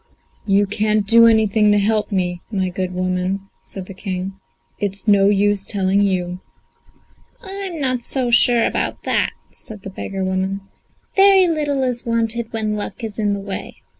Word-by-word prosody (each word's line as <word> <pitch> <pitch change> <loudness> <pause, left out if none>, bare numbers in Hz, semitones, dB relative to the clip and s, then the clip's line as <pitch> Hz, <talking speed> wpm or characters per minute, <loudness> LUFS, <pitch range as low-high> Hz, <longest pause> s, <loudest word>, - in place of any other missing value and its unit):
"You 200 +1 +4
can't 210 +1 0
do 230 +2 +6
anything 220 -1 +3
to 205 - +4
help 210 +1 +1
me, 180 -2 -1
my 190 -3 0
good 185 0 -3
woman," 185 +1 -1 0.2
said 190 -2 -9
the 195 - -9
King; 185 0 -4 0.5
"it's 200 +1 -4
no 200 -1 +5
use 205 0 +2
telling 195 -1 +1
you." 180 -2 -1 1.0
"I 385 - -7
am 390 -4 -5
not 255 -3 -1
so 245 0 -2
sure 235 0 +5
about - - -2
that," - - +1 0.2
said 210 -3 -10
the 195 - -7
beggar 195 0 -5
woman. 190 +1 -1 0.5
"Very 390 -1 +6
little 295 -4 0
is 250 -2 -1
wanted 230 0 -1
when 215 -2 -1
luck 210 +3 -6
is 220 -1 -5
in 205 -1 +1
the 200 - -3
way. 195 -1 -7
205 Hz, 165 wpm, -20 LUFS, 195-230 Hz, 1.0 s, do